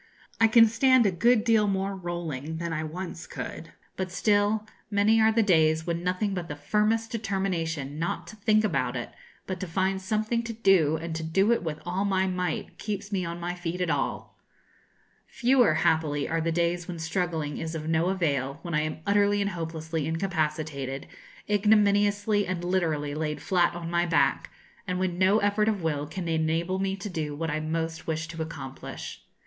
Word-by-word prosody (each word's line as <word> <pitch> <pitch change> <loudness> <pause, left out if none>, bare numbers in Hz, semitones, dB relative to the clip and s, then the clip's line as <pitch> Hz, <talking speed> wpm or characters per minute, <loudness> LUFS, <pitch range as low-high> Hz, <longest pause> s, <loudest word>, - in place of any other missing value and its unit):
I 225 - +6
can 225 +1 +7
stand 255 +2 +4
a 200 - +3
good 215 +6 +3
deal 225 -3 +3
more 195 0 -1
rolling 165 -5 -4
than 170 0 -3
I 155 0 -2
once 170 +1 -6
could; 165 - -7 0.2
but 185 -1 -3
still, 205 +2 +2 0.2
many 215 +2 +4
are 220 0 +5
the 225 0 +3
days 160 -4 +3
when 170 0 -2
nothing 185 +3 0
but 180 -3 -4
the 145 - -5
firmest 215 +9 0
determination 175 - -2
not 170 - -2
to - - -11
think 215 0 +2
about 135 -10 0
it, 120 - -5 0.3
but 185 -2 -4
to 185 - -4
find 190 +3 0
something 215 +4 0
to 235 0 -5
do, 190 -8 +4
and 160 0 -4
to 160 - -3
do 190 +7 +2
it 235 - +2
with 160 -3 -3
all 180 +3 -1
my 190 -2 +1
might, 180 -3 -3
keeps 205 -1 -4
me 190 -2 0
on 170 +1 -5
my 175 +1 -3
feet 175 0 -4
at 180 -2 0
all. - - -2 0.9
Fewer, 245 -8 +3
happily, 150 -3 +1
are 165 0 0
the 165 +1 0
days 170 +1 0
when 175 - -5
struggling 160 -2 -2
is 160 0 -4
of 155 -1 -5
no 160 +1 +2
avail, 140 -7 0
when 170 - -5
I 150 - +2
am 155 +1 -4
utterly 205 0 +3
and 200 0 0
hopelessly 160 -2 -3
incapacitated, 155 -5 -2 0.4
ignominiously 205 0 +3
and 180 -1 -3
literally 160 -5 0
laid 150 0 -2
flat 180 -3 +2
on 170 -1 -5
my 175 0 +2
back, 165 - +2 0.4
and 180 -1 -1
when 180 -1 -1
no 190 +3 +5
effort 205 +1 +2
of 205 -5 -2
will 150 -2 -1
can 175 +3 -5
enable 165 +3 0
me 195 0 0
to 195 +2 -6
do 155 -6 -3
what 165 +1 -2
I 155 - -1
most 160 +1 -3
wish 160 0 -2
to 165 -1 -6
accomplish. 140 -5 -7
175 Hz, 190 wpm, -27 LUFS, 160-205 Hz, 0.9 s, can